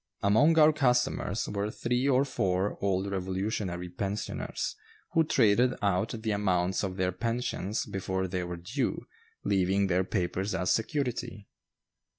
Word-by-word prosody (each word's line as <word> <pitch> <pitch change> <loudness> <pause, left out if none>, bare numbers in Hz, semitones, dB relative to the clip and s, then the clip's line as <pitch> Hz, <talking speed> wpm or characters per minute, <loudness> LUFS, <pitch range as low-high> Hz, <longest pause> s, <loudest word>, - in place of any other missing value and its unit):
Among 135 +11 +4
our 155 0 +7
customers 125 -7 +1
were 100 0 -2
three 125 +4 0
or 135 +1 +4
four 95 -6 0
old 100 0 0
Revolutionary 95 -1 -2
pensioners, 100 +3 -3 0.4
who 165 - +4
traded 125 -3 +3
out 105 +3 0
the 110 - 0
amounts 95 -3 +1
of 95 -2 -2
their 90 -1 +1
pensions 115 0 -2
before 95 -1 -2
they 90 0 -2
were 90 0 -5
due, 115 - -2 0.4
leaving 95 +1 +2
their 95 0 +2
papers 95 +1 -1
as 90 +1 0
security. 120 -4 -2
100 Hz, 135 wpm, -29 LUFS, 95-120 Hz, 0.4 s, our